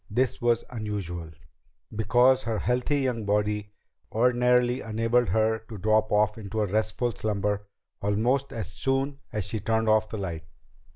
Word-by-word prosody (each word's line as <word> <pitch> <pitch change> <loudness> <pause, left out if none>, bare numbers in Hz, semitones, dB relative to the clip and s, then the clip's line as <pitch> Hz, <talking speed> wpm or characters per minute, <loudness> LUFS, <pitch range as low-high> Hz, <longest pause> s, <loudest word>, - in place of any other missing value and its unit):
This 125 +4 0
was 120 -1 +2
unusual, 100 -8 -4 0.7
because 125 +5 +4
her 115 -2 -1
healthy 125 +5 0
young 125 -4 -1
body 105 0 0 0.4
ordinarily 125 +1 +3
enabled 115 +2 +1
her 110 0 +2
to 110 - -7
drop 110 +2 +2
off 105 +1 +2
into 105 +1 -2
restful 110 +4 0
slumber 105 -2 -2 0.3
almost 120 +7 +1
as 100 -5 -5
soon 135 +6 -1
as 105 -3 -2
she 110 +2 -3
turned 110 +1 0
off 110 0 +3
the 110 - -5
light. 85 -5 -5
110 Hz, 140 wpm, -27 LUFS, 105-120 Hz, 0.7 s, because